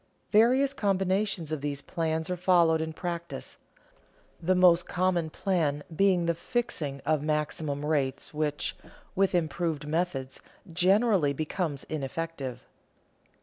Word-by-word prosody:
Various 255 +6 +4
combinations 195 - 0
of 155 -3 -2
these 140 -1 -3
plans 160 -2 -2
are - - 0
followed 170 -3 +4
in 160 0 -3
practice, 170 -3 -5 0.8
the 185 +3 +2
most 180 -1 +5
common 180 -3 +1
plan 155 -5 0
being 185 -1 +3
the 170 - +2
fixing 165 - -3
of 155 -2 +2
maximum 150 -1 -2
rates 140 -2 -1
which, 150 -1 -1 0.4
with 195 -1 +2
improved 160 -2 -1
methods, 150 -5 -2 0.3
generally 190 -3 +3
become 155 +2 -2
ineffective. 145 -2 -4
165 Hz, 115 wpm, -28 LUFS, 150-185 Hz, 0.8 s, most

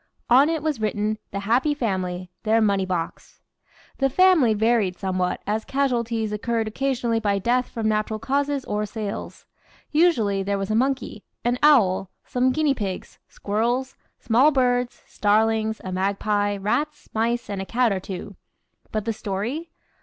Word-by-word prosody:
On 270 +5 +7
it 320 -3 -1
was 300 -7 -1
written 215 0 -1
"The 200 - -4
Happy 250 +8 +2
Family 185 -7 -2
their 225 0 +3
money 200 -3 +2
box." 175 -3 -4 0.6
The 270 -1 +3
family 320 -8 +4
varied 215 -4 +2
somewhat, 185 -1 -1
as 215 +1 -1
casualties 235 -5 -1
occurred 225 +1 -1
occasionally 240 -1 0
by 205 -2 +1
death 245 +5 +1
from 225 -2 -2
natural 215 0 0
causes 275 +4 -1
or 210 0 -2
sales. 210 -1 -6 0.5
Usually, 235 - +3
there 200 +1 -1
was 195 +1 -3
a - - +1
Monkey, 255 -3 -1 0.2
an 245 +1 +1
Owl, 195 -11 +4 0.2
some 255 +1 +1
Guinea 300 0 +2
pigs, 200 -7 -5
Squirrels, 240 +6 -1 0.2
small 245 +6 +4
birds, 250 -3 0
Starlings, 220 +1 +1
a 185 - -5
Magpie, 205 +2 0
Rats, 295 +10 -2
Mice, 235 +2 0
and 200 -2 -4
a - - -4
Cat 245 -1 +2
or 195 - 0
two. 190 +1 -7 0.6
But 215 -1 -2
the 225 - 0
story? 220 - -4
220 Hz, 155 wpm, -24 LUFS, 200-255 Hz, 0.6 s, On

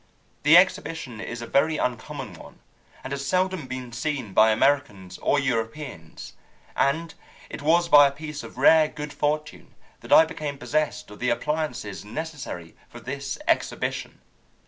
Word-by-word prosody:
The 155 +4 +7
exhibition 160 - +1
is 120 +1 -6
a - - -5
very 155 +5 +2
uncommon 125 -4 -4
one, - - -13 0.5
and 135 - -5
has 140 0 -3
seldom 185 -1 0
been 130 -1 -6
seen 125 -3 -3
by 110 +3 +6
Americans 110 -7 0
or 145 - +2
Europeans, 115 - -4 0.4
and 160 +4 0 0.4
it - - -6
was 170 +4 +3
by 145 -3 +8
a - - -2
piece 150 +1 -7
of - - -11
rare 160 -1 +6
good 150 -1 -7
fortune 150 +1 -3 0.2
that - - -12
I 160 - +8
became 150 -3 -5
possessed 145 -6 -2
of 105 - -12
the 125 - 0
appliances 125 -5 -2
necessary 125 - -7
for 120 - -11
this 135 +3 -5
exhibition. 330 - -1
140 Hz, 150 wpm, -25 LUFS, 120-155 Hz, 0.5 s, by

